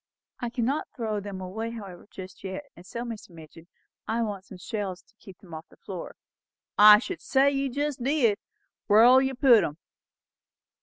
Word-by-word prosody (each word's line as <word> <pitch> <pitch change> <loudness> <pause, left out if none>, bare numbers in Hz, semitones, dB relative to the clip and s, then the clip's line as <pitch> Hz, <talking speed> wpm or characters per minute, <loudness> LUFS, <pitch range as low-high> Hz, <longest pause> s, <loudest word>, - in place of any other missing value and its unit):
"I 240 - -3
cannot 245 +5 -1
throw 220 -4 -2
them 200 -1 -7
away 215 +5 -4
however, 200 -6 -9
just 190 -1 -11
yet; 190 +7 -5
and 175 - -14
so, 235 +6 -6
Mr. 230 -5 -8
Midgin, 165 0 -14 0.4
I 230 +1 0
want 200 -3 -5
some 190 - -11
shelves 190 -1 -5
to - - -31
keep 190 -2 -14
them 175 -4 -15
off 160 +1 -9
the - - -21
floor." 185 -4 -8 0.6
"I 210 0 +9
should 330 - -5
say 275 +1 +3
you 275 -1 -1
jest 285 0 -3
did! 255 -7 +2 0.5
Where'll 240 +5 +7
you 265 0 -1
put 245 -4 +6
'em?" 150 - -4
215 Hz, 175 wpm, -27 LUFS, 190-250 Hz, 0.6 s, I